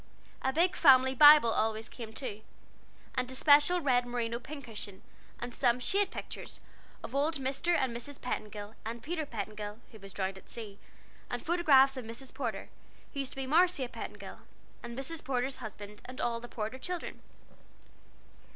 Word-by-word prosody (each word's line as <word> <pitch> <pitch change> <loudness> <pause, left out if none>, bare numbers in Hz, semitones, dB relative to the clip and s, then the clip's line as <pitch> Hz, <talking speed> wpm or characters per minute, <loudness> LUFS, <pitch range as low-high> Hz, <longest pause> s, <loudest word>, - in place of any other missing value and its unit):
A 265 - +1
big 350 +6 +2
family 260 -5 +6
Bible 295 -3 +9
always 220 0 0
came 225 -3 -8
too, 220 -3 -6 0.7
and 255 -1 -1
a 260 - -5
special 295 +6 +5
red 250 -4 +2
merino 235 -1 -2
pin 280 +3 -9
cushion, 210 -4 -8 0.4
and 240 0 -5
some 245 -1 +2
"shade 395 +10 +2
pictures" - - -8 0.4
of - - -7
old 295 +4 +1
Mr. 275 +5 0
and 255 -3 -1
Mrs. 270 +4 -6
Petingill 210 -3 -5
and 230 +1 -6
Peter 315 -1 -3
Petingill, 210 -2 -5
who 220 - -13
was 195 0 -10
drowned 190 0 -3
at - - -20
sea; 210 -4 -8 0.5
and - - -4
photographs 280 -6 +5
of 255 - -5
Mrs. 230 +4 -7
Porter, - - -4 0.4
who 280 - -5
used 270 -1 -3
to - - -13
be 270 0 -3
Marcia 320 -1 +3
Petingill, 240 - -8 0.4
and 235 0 -8
Mrs. 310 +4 -4
Porter's 260 0 -1
husband, 210 -3 -9
and 255 +1 -9
all 235 -1 0
the 240 - -9
Porter 220 +2 -5
children. 355 +5 -5
255 Hz, 170 wpm, -31 LUFS, 225-285 Hz, 0.7 s, Bible